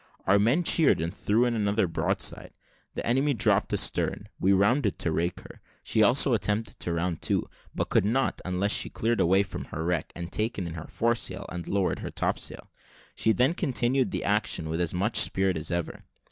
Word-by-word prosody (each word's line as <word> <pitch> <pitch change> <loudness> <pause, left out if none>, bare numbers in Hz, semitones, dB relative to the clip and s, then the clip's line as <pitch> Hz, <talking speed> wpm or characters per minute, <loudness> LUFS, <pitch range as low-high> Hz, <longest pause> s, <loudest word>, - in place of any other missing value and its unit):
Our 100 +1 +4
men 120 +12 +2
cheered, 160 -2 +4
and 85 +1 -3
threw 115 +4 +1
in 120 - 0
another 105 -1 +1
broadside. 80 -2 -2 0.4
The - - -4
enemy 135 +4 +1
dropped 110 - +2
astern; - - 0
we 95 - +2
rounded 100 +3 +2
to 85 - -1
rake 85 +3 -2
her; - - -14 0.2
she 110 - +1
also 125 +4 +4
attempted 105 -1 -1
to 85 - -2
round 85 0 -2
to, - - 0 0.3
but - - -2
could - - +3
not 120 +7 0
until 90 +2 -1
she - - +2
had - - -31
cleared 115 +1 0
away 95 +3 +3
her 80 -4 -6
wreck, 85 -3 -1
and 85 0 -7
taken 110 -3 -2
in 85 - -6
her 80 -1 -8
foresail, 115 -5 -1
and 90 -1 -6
lowered 100 -2 0
her - - -5
topsail. - - -3 0.4
She 110 - +2
then 125 - +2
continued 130 -5 0
the - - -3
action 80 - 0
with 80 +2 -2
as 85 - 0
much 100 +5 0
spirit 95 -3 +2
as 80 - -4
ever. 85 -1 -4
100 Hz, 195 wpm, -27 LUFS, 90-120 Hz, 0.4 s, Our